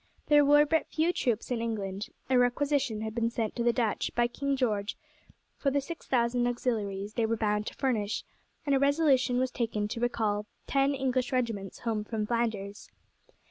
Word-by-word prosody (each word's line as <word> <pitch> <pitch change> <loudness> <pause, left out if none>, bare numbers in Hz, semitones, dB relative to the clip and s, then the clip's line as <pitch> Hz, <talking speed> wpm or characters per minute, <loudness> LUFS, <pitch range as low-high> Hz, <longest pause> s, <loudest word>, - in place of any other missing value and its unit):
There 295 -1 +7
were 295 +1 +6
but 320 +2 +1
few 325 +3 +1
troops 240 -5 -1
in 235 -2 0
England. 205 -3 -3 0.2
A 260 - +2
requisition 255 -2 +1
had 220 0 -4
been 230 0 0
sent 225 -2 -3
to 235 - -1
the 240 - +4
Dutch 230 -3 0
by 240 - +3
King 280 +3 -1
George 215 -6 -1 0.6
for 280 - +2
the 285 +1 +1
six 320 +4 -8
thousand 240 -1 +2
auxiliaries 210 -5 -2
they 230 -2 +1
were 230 0 0
bound 210 -1 0
to - - -5
furnish, 220 -6 -1 0.4
and 285 - +2
a 270 - +4
resolution 280 -3 +3
was 255 0 +1
taken 220 -3 -1
to 230 - -4
recall 215 -3 0 0.2
ten 275 0 +2
English 260 -1 0
regiments 230 -7 -2
home 220 -3 -1
from 215 0 -3
Flanders. 210 -3 -2
240 Hz, 180 wpm, -29 LUFS, 215-270 Hz, 0.6 s, There